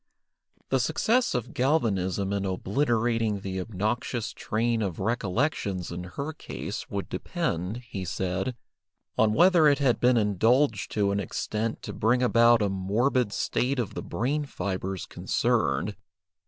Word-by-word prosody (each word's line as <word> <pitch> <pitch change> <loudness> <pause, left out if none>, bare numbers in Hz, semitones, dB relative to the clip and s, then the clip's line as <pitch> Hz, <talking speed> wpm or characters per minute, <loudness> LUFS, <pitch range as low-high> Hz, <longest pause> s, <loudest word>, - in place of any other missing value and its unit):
The 135 - +2
success 225 - +1
of 125 -1 -3
galvanism 100 - +1
in 100 -1 -1
obliterating 110 +2 0
the 95 -1 -3
obnoxious 110 +4 -2
train 115 +1 -1
of 95 -6 -2
recollections 100 - -1
in 90 +1 -5
her 140 +12 -5
case - - -6
would - - -3
depend, 90 +9 -3
he 95 -4 -5
said, 95 +6 -2 0.6
on 110 -1 +3
whether 170 +1 +6
it 145 -1 +5
had 135 -4 +2
been 125 0 +4
indulged 110 +3 +2
to 100 -2 +2
an 100 - 0
extent 110 +4 -3
to - - -5
bring 120 +3 +2
about 115 -2 +5
a - - +2
morbid 105 +5 +1
state 130 +5 0
of 120 -5 -2
the - - -4
brain 145 +7 -1
fibres 95 -5 -4
concerned. - - 0
110 Hz, 140 wpm, -27 LUFS, 95-125 Hz, 0.6 s, whether